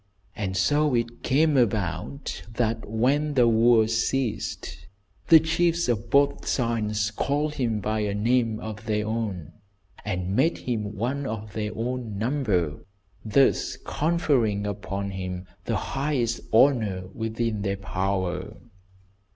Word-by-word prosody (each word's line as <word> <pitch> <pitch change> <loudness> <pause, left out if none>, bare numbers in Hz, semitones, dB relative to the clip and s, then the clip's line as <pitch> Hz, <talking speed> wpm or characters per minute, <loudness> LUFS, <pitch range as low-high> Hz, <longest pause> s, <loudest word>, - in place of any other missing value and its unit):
And 95 -3 -3
so 145 +8 +2
it 120 0 -2
came 150 +3 +3
about 110 - -1
that 115 -2 -1
when 140 +7 +1
the 125 -2 +5
wars 115 -1 +4
ceased, 110 - -3 0.4
the 160 - +9
chiefs 165 +1 +1
of 115 -1 -1
both 140 +2 +2
sides 105 -3 0
called 145 +7 -1
him 115 -7 -1
by 110 +2 -1
a 105 -1 -1
name 115 0 +1
of 110 -1 -7
their 105 -1 0
own, 105 -8 -3 0.5
and 95 -1 -2
made 155 +8 +3
him 110 -4 -3
one 130 +6 -2
of 110 -2 -5
their 105 -1 -2
own 120 -2 -3
number, 105 - 0 0.4
thus 120 +5 +2
conferring 135 -11 +1
upon 100 -1 -4
him 90 -1 -5 0.2
the 115 - 0
highest 135 -2 -1
honour 110 -7 +3
within 110 -1 -2
their 100 -1 -1
power. 95 0 -2
110 Hz, 125 wpm, -26 LUFS, 100-130 Hz, 0.5 s, the